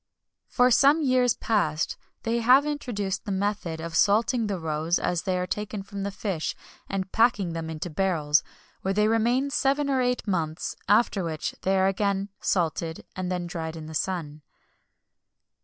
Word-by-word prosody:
For 250 0 +3
some 285 +6 +5
years 255 -3 +3
past, 160 -9 0 0.3
they 230 +1 0
have 255 +5 +5
introduced 210 -10 -3
the 205 - -3
method 190 -4 -2
of 165 0 -5
salting 220 +5 +3
the 200 -2 -2
roes 160 +1 0
as 175 -2 -1
they 185 -2 -1
are 180 - -1
taken 210 +3 -4
from 200 0 -7
the 200 - -2
fish, 195 -5 -3 0.3
and 190 -1 -3
packing 210 -7 +2
them 165 -1 -4
into 160 +2 -4
barrels, 155 -4 +2 0.4
where 195 0 -1
they 210 +1 +3
remain 240 +5 +2
seven 280 +1 +1
or 260 -1 +2
eight 250 0 0
months; 165 -4 -2
after 205 -2 +3
which 160 -2 -3
they 190 +1 +2
are 190 - +3
again 195 0 0
salted, 165 -2 -1
and 185 -1 -3
then 180 -1 -2
dried 165 -2 -5
in 160 -1 -7
the 160 - -8
sun. 155 -3 -3
195 Hz, 170 wpm, -26 LUFS, 165-225 Hz, 0.4 s, some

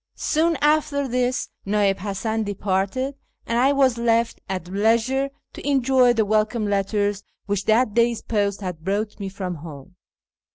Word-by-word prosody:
Soon 325 +1 +1
after 295 -2 +2
this 250 0 -1
Na'ib 200 -1 +1
Hasan 215 +3 -2
departed, 205 +6 -1 0.3
and 230 +1 0
I 265 +3 +4
was 265 -4 +2
left 230 0 +1
at 185 -3 -4
leisure 230 +8 +1 0.2
to - - -8
enjoy 260 -2 +4
the 225 -2 +1
welcome 215 +2 +1
letters 205 0 0 0.2
which 200 -1 -2
that 220 0 +3
day's 235 0 +2
post 205 -2 -1
had 180 -4 -5
brought 205 +4 -2
me 195 -1 -4
from 185 -3 -5
home. 155 +1 -11
215 Hz, 150 wpm, -23 LUFS, 195-250 Hz, 0.3 s, I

